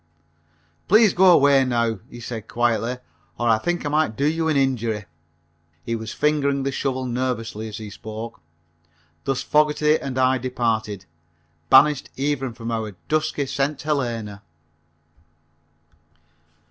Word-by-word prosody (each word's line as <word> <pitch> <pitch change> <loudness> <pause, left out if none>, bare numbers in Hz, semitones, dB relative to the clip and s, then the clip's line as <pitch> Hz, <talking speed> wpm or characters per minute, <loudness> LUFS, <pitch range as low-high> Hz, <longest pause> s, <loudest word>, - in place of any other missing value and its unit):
"Please 215 0 +5
go 185 0 +6
away 140 -4 +5
now," 115 -4 0
he 120 - -10
said 115 -2 -6
quietly, 120 +1 0 0.4
"or 120 - -1
I 110 -1 +4
think 175 +4 -2
I - - 0
might 150 -7 +1
do 140 - 0
you 160 +2 +1
an 155 - +2
injury." 115 -6 0 0.8
He 115 - -1
was 110 0 -6
fingering 140 -2 +1
the 135 - -1
shovel 130 -1 -2
nervously 120 -3 -3
as 110 - -7
he 110 -2 -8
spoke. 110 +1 -8 0.8
Thus 135 -1 -1
Fogerty 150 0 +3
and 130 -2 -5
I 130 0 +3
departed, 110 -6 -2 0.6
banished 145 +1 +5
even 135 -2 -1
from 115 0 -5
our 110 -3 -3
dusky 155 -2 0
St. 140 +2 -1
Helena. 120 -9 -2
130 Hz, 135 wpm, -23 LUFS, 115-145 Hz, 0.8 s, go